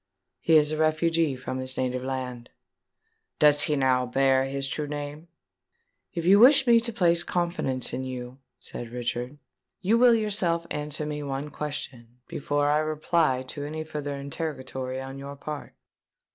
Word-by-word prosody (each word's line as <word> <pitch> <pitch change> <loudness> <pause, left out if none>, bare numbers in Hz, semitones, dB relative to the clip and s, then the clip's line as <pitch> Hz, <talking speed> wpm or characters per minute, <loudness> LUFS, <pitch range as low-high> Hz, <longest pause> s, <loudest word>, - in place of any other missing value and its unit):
"He 165 - +3
is 150 -1 +5
a 155 - -2
refugee 155 -1 +2
from 130 0 -5
his 130 0 -2
native 125 0 -1
land." 130 -2 -5 0.9
"Does 145 -1 +5
he 150 - +2
now 130 -2 +2
bear 135 +1 +3
his 135 0 -2
true 150 +2 -3
name?" 145 +2 -6 0.9
"If 170 -1 -2
you 195 +3 +7
wish 265 +3 +7
me 235 -2 +6
to 235 +1 -2
place 175 -6 +3
confidence 170 -8 -2
in 130 - -3
you," 125 0 -7 0.2
said 120 - -8
Richard, 125 +3 -4 0.4
"you 220 +5 +2
will 245 -1 +7
yourself 190 -6 0
answer 150 0 -3
me 150 0 -4
one 140 +1 -4
question, 125 -5 -6
before 145 0 0
I 150 - +3
reply 155 -3 +1
to 145 +1 -5
any 155 +2 -4
farther 150 -2 -5
interrogatory 130 -3 -5
on 135 +1 -7
your 140 +1 -7
part." 150 +1 -7
145 Hz, 160 wpm, -26 LUFS, 130-160 Hz, 0.9 s, you